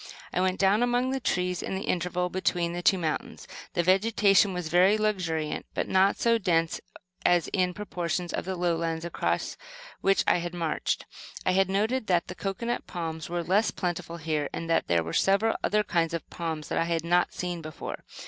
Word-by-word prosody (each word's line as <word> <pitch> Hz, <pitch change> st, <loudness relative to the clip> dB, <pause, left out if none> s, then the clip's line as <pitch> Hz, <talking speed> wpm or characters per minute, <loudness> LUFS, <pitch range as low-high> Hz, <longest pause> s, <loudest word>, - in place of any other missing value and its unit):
I 180 Hz, -, +1 dB
went 185 Hz, 0 st, +1 dB
down 200 Hz, +3 st, +4 dB
among 245 Hz, +1 st, +1 dB
the 270 Hz, -, -1 dB
trees 180 Hz, -6 st, -1 dB
in -, -, -3 dB
the 190 Hz, -, -3 dB
intervale 180 Hz, 0 st, -1 dB
between 175 Hz, -2 st, 0 dB
the 175 Hz, -, -3 dB
two 190 Hz, -, +4 dB
mountains. 160 Hz, -3 st, -3 dB, 0.3 s
The 175 Hz, -, +2 dB
vegetation 195 Hz, +1 st, +4 dB
was 180 Hz, -2 st, -3 dB
very 180 Hz, +5 st, +4 dB
luxuriant, 180 Hz, -8 st, -1 dB
but -, -, -1 dB
not 190 Hz, +1 st, +3 dB
so 230 Hz, -1 st, +3 dB
dense 165 Hz, -4 st, +1 dB, 0.4 s
as 175 Hz, -1 st, +3 dB
in 180 Hz, -2 st, 0 dB
portions 175 Hz, -3 st, -3 dB
of -, -, -2 dB
the 190 Hz, 0 st, -2 dB
lowlands 165 Hz, -2 st, -1 dB
across 170 Hz, -, -2 dB, 0.4 s
which 195 Hz, 0 st, +3 dB
I -, -, +3 dB
had 175 Hz, +1 st, -5 dB
marched. 165 Hz, -3 st, -1 dB, 0.4 s
I -, -, +3 dB
had 190 Hz, 0 st, +3 dB
noted 215 Hz, +5 st, 0 dB
that 175 Hz, -2 st, +1 dB
the -, -, -4 dB
cocoanut 235 Hz, +6 st, -3 dB
palms 160 Hz, -3 st, -5 dB
were 175 Hz, 0 st, -2 dB
less 200 Hz, +6 st, +2 dB
plentiful 175 Hz, -2 st, -3 dB
here, 155 Hz, -3 st, -2 dB
and 165 Hz, -, -5 dB
that -, -, +2 dB
there 85 Hz, -1 st, +2 dB
were 80 Hz, -, -6 dB
several 200 Hz, +3 st, +3 dB
other 210 Hz, 0 st, +2 dB
kinds 170 Hz, -3 st, 0 dB
of 165 Hz, -, -5 dB
palms 160 Hz, -3 st, -4 dB
that -, -, 0 dB
I 165 Hz, -, +2 dB
had 165 Hz, -1 st, -1 dB
not 175 Hz, +1 st, +2 dB
seen 175 Hz, -2 st, -4 dB
before. 155 Hz, -2 st, -7 dB
180 Hz, 195 wpm, -27 LUFS, 170-195 Hz, 0.4 s, down